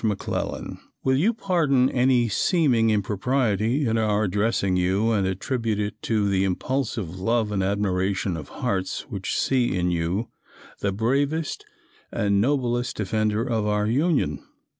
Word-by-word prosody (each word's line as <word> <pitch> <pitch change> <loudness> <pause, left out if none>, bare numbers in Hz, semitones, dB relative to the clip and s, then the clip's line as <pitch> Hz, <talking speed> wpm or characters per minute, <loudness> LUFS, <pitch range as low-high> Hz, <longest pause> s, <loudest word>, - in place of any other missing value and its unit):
McClellan: 105 -3 -3 0.2
"Will 130 0 +2
you 175 +12 +3
pardon 165 - +2
any 125 -1 +3
seeming 125 - +2
impropriety 110 +4 +1
in 115 -1 +1
our 105 -1 +1
addressing 100 -1 +1
you, 95 +5 +1
and 100 -4 +1
attribute 110 +3 -2
it 105 +1 -3
to 105 -3 0
the 95 -1 +2
impulsive 100 -2 -2
love 115 +2 +1
and 100 -2 0
admiration 95 -1 0
of 75 -4 -7
hearts 95 -1 -2
which 100 -5 -3
see 125 -6 +1
in 90 0 +1
you, 85 +6 -1 0.5
the 100 - 0
bravest 140 +9 -1 0.5
and 100 -1 +1
noblest 125 -1 0
defender 110 +1 0
of 110 -4 0
our 105 0 +1
Union. 125 - +1
110 Hz, 140 wpm, -24 LUFS, 100-125 Hz, 0.5 s, you